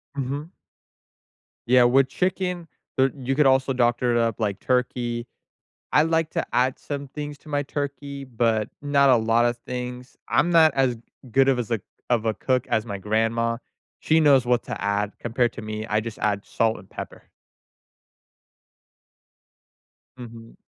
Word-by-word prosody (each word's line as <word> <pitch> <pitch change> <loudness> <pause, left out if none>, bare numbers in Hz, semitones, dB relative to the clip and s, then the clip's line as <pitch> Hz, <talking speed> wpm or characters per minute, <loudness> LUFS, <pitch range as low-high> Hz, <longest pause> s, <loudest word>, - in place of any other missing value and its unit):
Mhm. 140 +4 -4 1.2
Yeah, 125 0 +6
with 130 +2 +4
chicken, 180 +1 -2 0.3
uh, 135 +1 +4
you 135 -1 -3
could 150 -1 +3
also 130 0 +3
doctor 120 0 +2
it - - +3
up 115 -2 0
like 100 -3 -1
turkey. 120 -1 -1 0.7
I 150 - +6
like 160 -1 +1
to - - -2
add 130 +1 +2
some 140 -1 -6
things 145 +1 -6
to 155 - -17
my 145 -1 -1
turkey, 140 0 -5
but 115 -4 0
not 140 -1 +3
a 125 - +6
lot 115 +1 +2
of 120 0 +1
things, 125 0 -6
I'm 175 - +2
not 160 -3 +6
as 130 -3 +2 0.4
good 135 +2 +4
of 130 -2 +3
as 120 -1 -3
a 110 - 0 0.3
of 115 -2 +1
a 110 - +1
cook 130 -1 0
as 110 +1 0
my 100 -2 -4
grandma, 115 +3 0 0.4
she 160 - +3
knows 140 -4 +5
what 125 -1 +2
to - - -5
add 100 0 -1
compared 120 +1 0
to 115 - -7
me, 110 0 -5
I 105 -1 +1
just 110 0 -7
add 100 -1 0
salt 115 -1 0
and 95 +2 -15
pepper. - - -9 2.9
Mhm. 115 -2 -11
125 Hz, 160 wpm, -24 LUFS, 115-140 Hz, 2.9 s, Yeah